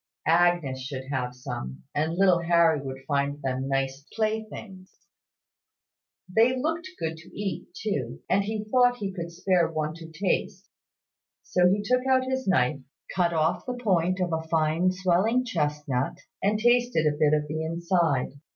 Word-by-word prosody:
Agnes 165 -5 +3
should 130 0 -5
have 125 -2 -2
some; 65 - -6
and 155 +3 0
little 185 -2 +4
Harry 170 -3 +3
would 135 -1 -7
find 140 0 0
them 130 0 -2
nice 135 0 -1
playthings. 215 -3 -4 1.2
They 225 +7 +3
looked 325 +6 -2
good 160 0 -3
to 165 +4 -13
eat 205 -2 -3
too; 140 - -3
and 195 +2 +2
he 215 +1 -3
thought 245 +2 +3
he 200 -4 -3
could 170 -2 -5
spare 175 -1 +1
one 155 -1 -2
to 165 0 -11
taste; 185 +2 -2 0.7
so 180 0 +3
he 205 +2 +1
took 250 +4 +2
out 260 -1 +4
his 260 -2 -2
knife, 140 -6 +2 0.4
cut 175 -2 +2
off 160 +5 0
the 250 0 -3
point 185 -5 +1
of 175 -2 0
a 160 - 0
fine 160 +3 +2
swelling 185 +7 +2
chestnut, 150 - -1 0.2
and 205 +2 +2
tasted 240 -6 +3
a 150 -1 +2
bit 150 0 +3
of 150 0 -1
the 155 +2 -3
inside. 165 -4 0
170 Hz, 160 wpm, -26 LUFS, 150-205 Hz, 1.2 s, little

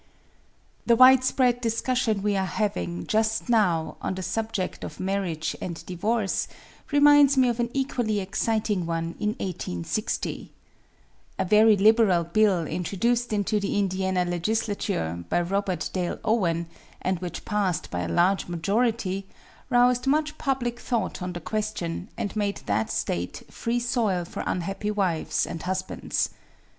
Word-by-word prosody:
The 235 - +4
widespread 255 0 +5
discussion 230 -2 0
we 205 -1 +1
are 190 - +1
having, 200 -4 -2
just 220 +2 0
now, 180 -9 +2
on 185 - -2
the 185 - -5
subject 220 -2 -3
of - - -7
marriage 185 -5 -2
and 170 -2 -6
divorce, 205 +3 -1 0.4
reminds 290 -1 +6
me 255 -1 +5
of 240 0 -2
an 240 0 0
equally 245 -6 -1
exciting 200 -1 -1
one 165 0 -2
in 215 +1 -1
1860. 90 - -3 0.9
A - - 0
very 215 +2 +6
liberal 210 -4 +5
bill, 180 0 +2
introduced 225 +9 -1
into 210 0 +1
the 200 0 -1
Indiana 190 -2 0
legislature 175 - -1
by - - +2
Robert 190 +1 -1
Dale 180 -2 -2
Owen, 170 -7 +1 0.3
and 185 -1 -1
which 180 -2 -6
passed 200 -6 -1
by 90 - -2
a 90 - -2
large 185 +3 +2
majority, 195 +2 0 0.4
roused 245 +1 +3
much 305 +2 +1
public 245 -4 -1
thought 235 -5 -2
on 180 0 -3
the 175 - -5
question, 210 -1 -3
and 205 - -3
made 205 -1 -1
that 105 +2 0
State 90 +1 -3
free 235 +1 -1
soil 225 -7 0
for - - -6
unhappy 195 +4 -2
wives 190 -6 0
and 165 - -6
husbands. 185 +1 -2
200 Hz, 140 wpm, -26 LUFS, 180-230 Hz, 0.9 s, reminds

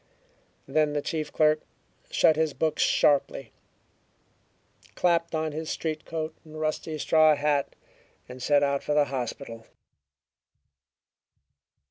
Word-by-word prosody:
Then 155 -1 +1
the 145 - -1
chief 155 -2 -3
clerk 155 0 +3 0.5
shut 160 - +4
his 155 -2 0
books 160 -1 0
sharply, 140 -4 +2 1.4
clapped 170 -2 +1
on 155 0 -1
his 160 +2 -5
street 155 -1 -3
coat 160 -1 -4
and 155 -1 -11
rusty 155 0 -2
straw 155 0 +4
hat, 145 -1 0 0.5
and 125 +1 -10
set 145 +3 +3
out 140 0 +1
for 150 - -2
the 150 -1 +4
hospital. 125 -3 -5
155 Hz, 115 wpm, -26 LUFS, 140-155 Hz, 1.4 s, shut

